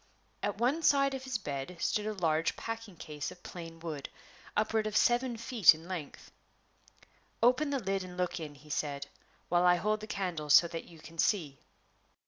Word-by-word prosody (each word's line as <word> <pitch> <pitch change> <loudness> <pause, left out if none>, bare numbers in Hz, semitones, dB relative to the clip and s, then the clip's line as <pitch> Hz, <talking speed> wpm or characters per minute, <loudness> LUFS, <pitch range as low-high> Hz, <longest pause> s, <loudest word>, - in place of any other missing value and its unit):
At 205 -1 -1
one 255 +8 +1
side 275 -3 +4
of 265 0 -5
his 260 -3 -1
bed 145 -2 -5
stood 210 +5 0
a 215 - -1
large 165 -4 +1
packing 225 -4 -6
case 150 -2 -5
of 180 -1 -14
plain 165 -2 -8
wood, 160 -4 -5 0.5
upward 215 0 +1
of 215 0 0
seven 240 0 +3
feet 225 -7 +6
in 160 +2 -12
length. 175 -6 -7 1.1
"Open 255 +5 +4
the 280 - 0
lid 195 -5 -1
and 180 -1 -9
look 180 -1 -1
in," 150 -3 -7
he 150 +2 -13
said, 145 -1 -2 0.4
"while 175 0 +3
I 180 0 +6
hold 210 +4 0
the 215 - -8
candle 175 -8 -3
so 170 +4 +8
that 165 -1 -5
you 170 - -14
can 165 +1 -13
see." 155 - +1
180 Hz, 185 wpm, -32 LUFS, 160-225 Hz, 1.1 s, so